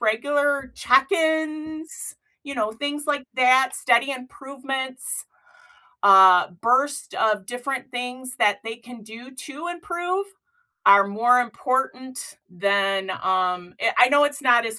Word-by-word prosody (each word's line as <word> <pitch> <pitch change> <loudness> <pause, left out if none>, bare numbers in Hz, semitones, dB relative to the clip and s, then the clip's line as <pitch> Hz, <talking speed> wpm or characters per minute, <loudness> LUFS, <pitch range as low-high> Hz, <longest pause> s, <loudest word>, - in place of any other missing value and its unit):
regular 280 +4 0
check-ins, 315 +2 0 0.3
you 280 -1 -8
know, 215 -3 -2
things 290 +5 -4
like 285 -2 -1
that, 260 +1 +3
steady 240 +2 +2
improvements, 265 0 -6 0.8
uh, 190 -2 +7
burst 270 +5 0
of 210 -3 0
different 260 +2 -5
things 250 +1 -6
that 205 -5 +2
they 225 0 -7
can 240 -1 -14
do 230 +5 -13
to 295 +4 -9
improve, 350 +2 -4 0.6
are 200 0 +7
more 240 +5 +3
important 255 +1 -3
than, 195 +1 0
um 180 -1 -1
eh, - - +1
I 245 - +7
know 285 0 +5
it's 290 0 -3
not 240 -2 +4
as 220 0 -5
255 Hz, 125 wpm, -22 LUFS, 220-285 Hz, 0.8 s, uh